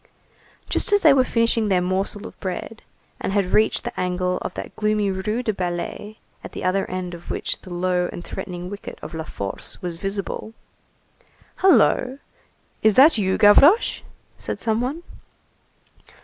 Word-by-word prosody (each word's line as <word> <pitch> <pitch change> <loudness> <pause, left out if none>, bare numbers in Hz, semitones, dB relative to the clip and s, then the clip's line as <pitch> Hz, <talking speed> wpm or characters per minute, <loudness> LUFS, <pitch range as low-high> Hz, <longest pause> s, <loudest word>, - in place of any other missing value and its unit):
Just - - +1
as 410 - +5
they 310 -6 +7
were 265 -1 +4
finishing 230 -2 +1
their 190 -3 +3
morsel 190 +3 -1
of - - -11
bread, 200 +4 -5 0.4
and 195 - -3
had 200 -2 +2
reached 215 - +3
the 240 - -5
angle 180 0 -1
of - - -4
that - - -7
gloomy 210 -2 +1
Rue 210 +6 -2
des 220 - 0
Ballets, 185 +3 -4 0.3
at - - -9
the - - -6
other 190 +1 0
end 185 -1 -4
of 170 0 -10
which - - -2
the 185 - -12
low 180 0 0
and 175 - -8
threatening 180 -2 -6
wicket 200 +2 -8
of - - -7
La 160 -1 -5
Force 100 -9 -7
was 175 -3 -5
visible:— 200 +3 -4 1.0
"Hullo, 270 -8 +4 0.6
is 215 -2 +4
that 275 -2 +7
you, 190 -2 +1
Gavroche?" 275 - +6 0.4
said - - -5
some 220 0 0
one. 285 +7 -3
200 Hz, 165 wpm, -22 LUFS, 180-225 Hz, 1.0 s, they